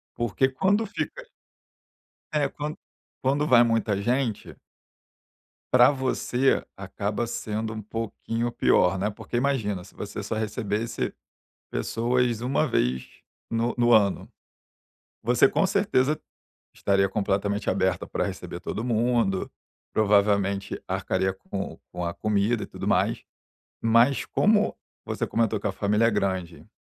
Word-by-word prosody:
porque 120 +3 +1
quando 200 +11 +1
fica - - -4 1.1
é 145 -2 +2
quan 150 +2 -5 0.5
quando 140 +3 +1
vai 120 -1 +7
muita 115 -3 +1
gente 120 0 -1 1.2
pra 125 +1 +7
você 130 -1 +1
acaba 100 +3 -3
sendo 110 0 -3
um 110 - -5
pouquinho 115 +2 -3
pior, 95 -4 +3
né, 100 +3 0
porque 120 - -5
imagina 110 -9 0
se - - -16
você - - -6
só - - -3
recebesse 110 +1 -2 0.6
pessoas 120 0 0
uma 125 +3 +1
vez 65 +1 -1 0.3
no 115 +1 0
no 120 0 +4
ano, 100 -3 +3 1.0
você 120 +3 +4
com 195 - +2
certeza 180 -8 +2 0.6
estaria 95 -1 +2
completamente 100 +1 0
aberta 95 -1 0
pra - - -1
receber - - -6
todo 110 - -4
mundo, 115 -5 +1 0.4
provavelmente 100 -2 +2
arcaria 95 0 0
com 95 +1 -6
com 90 0 -3
a 85 - -2
comida 105 +1 0
e - - -8
tudo - - -7
mais. - - +1 0.6
Mas, 115 +4 +4
como 210 0 +2 0.3
você - - -2
comentou 110 -2 +1
que - - -4
a 100 - 0
família 105 +3 +1
é 115 - +4
grande 95 -4 -2
115 Hz, 130 wpm, -26 LUFS, 100-125 Hz, 1.2 s, vai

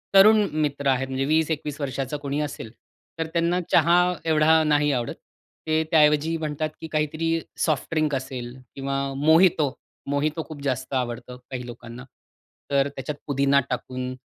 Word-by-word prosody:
तरुण 210 +2 +7 0.2
मित्र 140 -1 -1
आहेत 135 0 +1
म्हणजे 135 0 -2
20-21 155 -1 0
वर्षाचा 135 +1 -3
कोणी 145 0 -3
असेल 140 -6 -5 0.5
तर 165 - -1
त्यांना 170 +1 +1
चहा 170 +1 +5 0.3
एवढा 160 0 +4
नाही 150 -1 +2
आवडत. 120 -3 -1 0.5
ते 155 0 +2
त्याऐवजी 150 0 +4
म्हणतात 155 0 -2
की 160 - -5
काहीतरी 155 +2 0 0.2
सॉफ्ट 155 -5 0
ड्रिंक 155 -2 +1
असेल 130 -2 -5 0.2
किंवा 135 0 -3 0.2
मोहितो 160 0 +4 0.4
मोहितो 150 +3 0
खूप 150 -3 -9
जास्त 130 -1 -2
आवडतं 125 0 -3
काही 125 -2 -5
लोकांना. 120 0 -9 0.7
तर 140 0 +3
त्याच्यात 140 +1 -6
पुदिना 140 0 +3
टाकून 130 0 -4
145 Hz, 145 wpm, -24 LUFS, 135-155 Hz, 0.7 s, तरुण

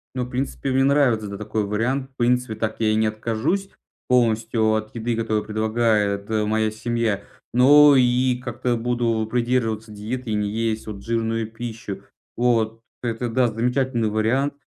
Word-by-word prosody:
Ну, 125 - -1
в 125 - -11
принципе, 135 +1 -3
мне 135 +1 +3
нравится, 135 -6 +3
да, 100 0 -6
такой 105 +1 -2
вариант. 130 +6 -1
В - - -39
принципе, 125 -1 +1
так 110 0 -2
я 110 - +2
и 110 - +2
не 110 0 +2
откажусь 115 - -1 0.4
полностью 115 -2 +2
от 110 0 -2
еды, 115 +1 -1
которую 110 -2 -1
предлагает, 110 -2 0
э, 110 -1 +1
моя 110 +1 +1
семья, 110 -2 -1 0.3
но 145 +4 +7
и 125 0 +3
как-то 120 0 -2
буду 115 -1 0
придерживаться 115 -3 0
диеты 110 +3 -5
и - - 0
не 105 -1 -1
есть 110 0 -2
вот 105 -2 -7
жирную 115 -1 -1
пищу. 110 -3 -7 0.3
Вот 115 -2 +1 0.2
это, 120 0 -2
да, 125 +1 +2
замечательный 120 0 0
вариант. 115 +7 +1
115 Hz, 165 wpm, -23 LUFS, 110-125 Hz, 0.4 s, но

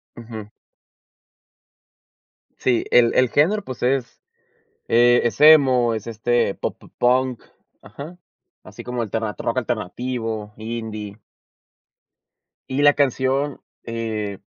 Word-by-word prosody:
Ujú. 110 -3 -9 2.1
Sí, 125 -3 0
el 120 -1 +5
el 130 -2 +4
género 195 +8 +2
pues 130 -1 -7
es, 130 -1 -1 0.7
eh, 120 +1 +5
es 120 +4 -2
emo, 130 -6 +6
es, 110 0 -6
este, 115 -1 0
pop - - -4 0.2
punk, 125 0 +1 0.4
ajá. 165 +6 -10 0.4
Así - - -11
como 125 -1 -3
alterna 110 0 -3
rock 115 +2 -2
alternativo, 115 -1 -4
indie. 110 -2 -6 1.5
Y 135 +2 -1
la 145 0 +6
canción, 140 +1 0 0.2
eh, 110 -4 -4
120 Hz, 105 wpm, -21 LUFS, 110-130 Hz, 2.1 s, emo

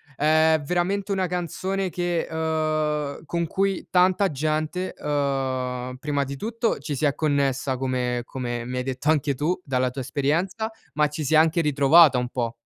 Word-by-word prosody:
è 155 +2 +3
veramente 185 +5 -1
una 190 -1 +1
canzone 185 +2 -2
che, 175 0 -1
uhm, 155 -2 -1
con 170 +1 -2
cui 195 +2 -1
tanta 185 +2 +3
gente, 155 +5 -2
uhm, 130 -3 -2
prima 145 0 -1
di 140 +1 -5
tutto 230 - -1
ci 145 +1 -4
si 145 - 0
è 145 - +2
connessa 140 -3 0
come 125 -2 -1
come 120 -2 -4
mi 125 +1 -4
hai 125 - -1
detto 130 +3 -2
anche 150 -2 +2
tu 155 +7 -1
dalla 130 -2 0
tua 130 +2 -6
esperienza, 175 - -1 0.2
ma 150 +1 +3
ci 150 +1 -5
si 150 - 0
è 155 - +7
anche 160 +1 +4
ritrovata 150 0 +5
un 125 0 -1
pò. 120 -2 -2
150 Hz, 170 wpm, -24 LUFS, 135-175 Hz, 0.2 s, è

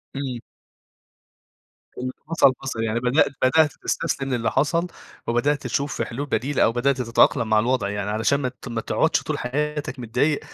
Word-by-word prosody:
إمم. 130 -3 -3 1.6
اللي 130 +1 -3 0.2
حصل، 150 -5 +5
حصل. 125 -4 -3
يعني 115 +1 0
بدأت 140 +3 +2
بدأت 150 +3 +4
تستسلم 135 -1 -2
للّي 115 -1 0
حصل 165 +6 +1 0.4
وبدأت 140 +5 +1
تشوف 140 +3 -2
في 115 - -1
حلول 130 +4 -4
بديلة 140 +1 0
أو - - +4
بدأت 130 +2 +1
تتأقلم 115 -1 +3
مع 110 0 +4
الوضع، 120 -2 0
يعني 100 0 -3
علشان 110 +6 +1
ما 130 -3 -1
ت - - -9
ما 115 -1 -3
تقعدش - - +1
طول - - -3
حياتك 145 +1 -3
متضايق 125 +6 0
130 Hz, 165 wpm, -23 LUFS, 115-145 Hz, 1.6 s, حصل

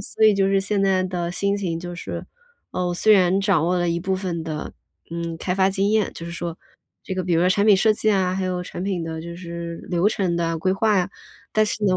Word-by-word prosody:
所 220 - 0
以 215 -2 +7
就 195 0 +2
是 195 0 +3
现 200 0 0
在 190 -1 +3
的 175 -2 -2
心 200 +2 0
情 175 -5 -2
就 175 0 -6
是， 175 - -6 0.5
呃， 180 - -1
我 - - -1
虽 215 +5 +4
然 185 0 +4
掌 195 -6 +2
握 180 +1 +2
了 175 0 +1
一 170 - 0
部 190 +2 0
分 180 -3 -3
的， 155 -2 -5 0.4
嗯， 170 -1 -4
开 180 - -1
发 190 0 +3
经 195 +1 +1
验， 215 -1 +2
就 170 - -7
是 170 - -6
说 170 0 -5 0.5
这 190 - -4
个 185 - -1
比 175 -2 +1
如 165 - +3
说 180 - +4
产 200 +2 +3
品 210 -2 +7
设 215 +3 +4
计 215 0 +1
啊， 185 -2 +2
还 190 - -1
有 180 -1 -2
产 180 - -6
品 185 -4 -1
的 160 0 -5
就 170 0 -7
是 170 -1 -6
流 180 +3 +3
程 185 -5 0
的 165 -1 -1
规 185 +3 +1
划 210 0 +2
呀。 180 - 0 0.4
但 215 - +4
是 210 0 -2
呢， 185 -2 +3
185 Hz, 280 characters per minute, -23 LUFS, 170-195 Hz, 0.5 s, 以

